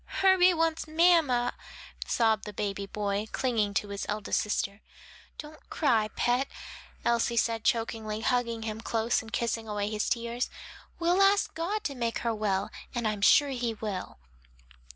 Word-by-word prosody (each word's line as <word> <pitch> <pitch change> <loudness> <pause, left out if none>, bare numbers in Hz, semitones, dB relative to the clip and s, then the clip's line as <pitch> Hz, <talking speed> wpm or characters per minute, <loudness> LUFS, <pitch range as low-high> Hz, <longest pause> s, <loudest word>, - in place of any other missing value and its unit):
"Herbie 370 -2 +5
wants 325 -1 0
mamma," 310 -7 +3 0.5
sobbed 220 -2 +2
the 210 - -7
baby 200 -1 -3
boy, 205 +1 -2
clinging 220 -6 0
to 205 - 0
his 200 0 -5
eldest 210 0 0
sister. 205 0 -2 0.6
"Don't 305 0 -11
cry, 235 -8 +2
pet," 250 +3 +1 0.6
Elsie 235 0 +1
said 225 -1 +1
chokingly, 220 -2 -1
hugging 235 -2 0
him 220 0 -4
close 230 0 0
and 225 - -12
kissing 230 -1 -2
away 210 0 -2
his 210 -1 -1
tears. 235 -1 -1 0.5
"We'll 345 +1 +2
all 390 0 +7
ask 405 - -1
God 365 +7 -2
to 280 - -2
make 235 -3 -2
her 230 - +1
well, 200 -2 -1 0.2
and 235 -2 0
I'm 210 -2 -2
sure 285 +8 +6
he 240 -4 -2
will." 205 -4 -5
230 Hz, 155 wpm, -29 LUFS, 215-270 Hz, 0.6 s, all